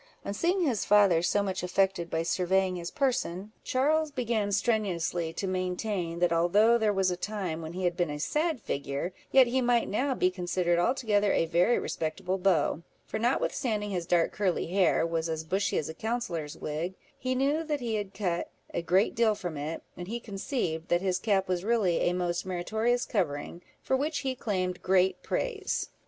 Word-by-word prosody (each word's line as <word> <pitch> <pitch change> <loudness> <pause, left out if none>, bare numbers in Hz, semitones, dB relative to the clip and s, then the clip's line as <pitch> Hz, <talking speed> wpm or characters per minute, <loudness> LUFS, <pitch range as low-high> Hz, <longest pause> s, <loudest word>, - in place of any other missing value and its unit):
On 200 - -2
seeing 350 - +1
his 245 -8 0
father 200 -5 +5
so 200 +4 +2
much 190 -1 -2
affected 180 -1 +1
by 165 0 -1
surveying 185 +2 +1
his 170 -1 -4
person, 215 - -1
Charles 305 +4 +2
began 235 -7 -1
strenuously 190 -6 0
to 195 - -3
maintain, 185 -1 -2
that 175 -1 +2
although 205 +8 +4
there 215 -2 +2
was 190 -2 +1
a - - -1
time 185 -4 -3
when 160 +1 -6
he 185 +1 -4
had 175 -1 +1
been 175 -2 0
a 150 - -4
sad 305 - 0
figure, 140 +3 -3 0.2
yet 265 -1 +7
he 255 +2 0
might 240 -1 +2
now 260 +6 0
be 185 - +2
considered 175 -1 0
altogether 210 -1 +2
a - - +2
very 175 +8 +3
respectable 180 +4 -2
beau; 175 -4 +2 0.2
for - - -4
notwithstanding 220 -3 0
his 175 -3 -3
dark 170 -2 +3
curly 190 -4 0
hair 180 -1 +2
was 165 0 -1
as 160 -1 -2
bushy 190 +5 0
as 155 - -1
a 160 - -5
counsellor's 180 -7 -3
wig, 160 +5 -3 0.2
he 255 0 -1
knew 285 +5 +1
that 300 -2 -2
he 235 -3 -3
had 205 -3 -2
cut 180 -4 -1 0.2
a - - -1
great 185 +4 +2
deal 225 -2 +3
from 175 -5 -5
it; 150 +3 -4
and 175 0 -7
he 235 +4 -3
conceived 195 - -3
that 175 0 +2
his 185 -1 +1
cap 195 -2 +1
was 180 -1 -1
really 210 -6 +2
a - - -1
most 175 -1 -1
meritorious 220 +7 0
covering, 170 -4 -2 0.2
for 265 - +1
which 290 +2 -1
he 265 -2 -1
claimed 185 -7 -2
great 185 0 +2
praise. 430 -5 -2
190 Hz, 190 wpm, -29 LUFS, 175-230 Hz, 0.2 s, yet